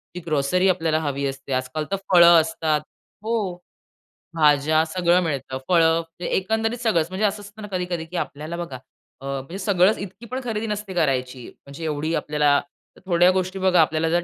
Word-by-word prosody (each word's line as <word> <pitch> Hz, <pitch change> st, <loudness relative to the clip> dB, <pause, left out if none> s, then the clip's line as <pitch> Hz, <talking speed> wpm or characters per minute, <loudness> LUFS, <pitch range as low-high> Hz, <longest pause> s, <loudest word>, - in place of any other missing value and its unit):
जी -, -, -4 dB
grocery 155 Hz, +4 st, +1 dB
आपल्याला 165 Hz, -3 st, +1 dB
हवी 140 Hz, -3 st, -2 dB
असते. 135 Hz, 0 st, -5 dB
आजकाल 130 Hz, +4 st, -2 dB
तर 195 Hz, -, +2 dB, 0.2 s
फळं 170 Hz, -2 st, +8 dB
असतात 155 Hz, -2 st, -1 dB, 0.4 s
हो. 230 Hz, +1 st, -1 dB, 1.0 s
भाज्या, 150 Hz, +1 st, +4 dB
सगळं 175 Hz, +1 st, +2 dB
मिळतं. 135 Hz, -4 st, -3 dB
फळं, 165 Hz, -2 st, +4 dB
म्हणजे 165 Hz, +1 st, -7 dB
एकंदरीत 220 Hz, +4 st, 0 dB
सगळंच, 200 Hz, -10 st, +1 dB
म्हणजे 190 Hz, +3 st, -1 dB
असं 205 Hz, 0 st, -1 dB
असतं 205 Hz, +2 st, -12 dB
ना 210 Hz, -, -7 dB
कधी-कधी 180 Hz, -3 st, -3 dB
की 175 Hz, +2 st, -11 dB
आपल्याला 155 Hz, +4 st, -4 dB
बघा 170 Hz, -6 st, -5 dB, 0.5 s
अ, -, -, -9 dB
म्हणजे 140 Hz, +6 st, -5 dB
सगळंच 190 Hz, +1 st, +3 dB
इतकी 200 Hz, +4 st, -8 dB
पण 255 Hz, -, -2 dB
खरेदी 225 Hz, -2 st, -3 dB
नसते 210 Hz, -2 st, -4 dB
करायची. 130 Hz, -6 st, -1 dB, 0.2 s
म्हणजे 140 Hz, +4 st, -10 dB
एवढी 155 Hz, +1 st, -2 dB
आपल्याला, 150 Hz, -1 st, +2 dB, 0.5 s
थोड्या 175 Hz, -1 st, +4 dB
गोष्टी 185 Hz, +1 st, -2 dB
बघा 185 Hz, -3 st, +4 dB
आपल्याला 160 Hz, +1 st, +1 dB
जर 175 Hz, +1 st, +1 dB
170 Hz, 175 wpm, -23 LUFS, 150-185 Hz, 1.0 s, फळं